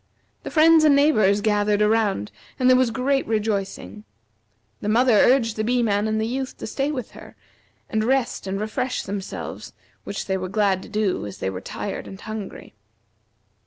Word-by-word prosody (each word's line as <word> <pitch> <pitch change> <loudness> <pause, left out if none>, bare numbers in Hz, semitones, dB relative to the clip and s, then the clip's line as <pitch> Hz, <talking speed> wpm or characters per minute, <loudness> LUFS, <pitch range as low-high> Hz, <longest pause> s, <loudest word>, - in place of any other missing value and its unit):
The - - -6
friends 320 0 +5
and 300 -2 +6
neighbors 215 -9 +3
gathered 210 -1 +1
around 210 - +1 0.3
and 255 - +2
there 255 - +7
was 255 -1 +3
great 265 +4 0
rejoicing. 200 - -3 0.8
The 205 - -3
mother 240 +3 +4
urged 230 0 +4
the 215 - 0
Bee 245 +2 +1
man 205 -1 +1
and 220 0 0
the 220 - 0
Youth 260 +3 -4
to - - -7
stay 280 +2 -2
with 255 -6 -5
her, - - -13 0.5
and 215 0 -1
rest 255 -4 0
and 195 +1 -2
refresh 250 +4 -2
themselves, 195 0 -6 0.3
which 200 - -5
they 190 -1 -1
were 185 0 -5
glad 195 -2 +1
to - - -12
do 210 - -1
as 100 - -9
they 95 - -3
were 90 -1 -6
tired 200 - -6
and 190 - -10
hungry. 215 -2 -8
215 Hz, 180 wpm, -23 LUFS, 200-255 Hz, 0.8 s, there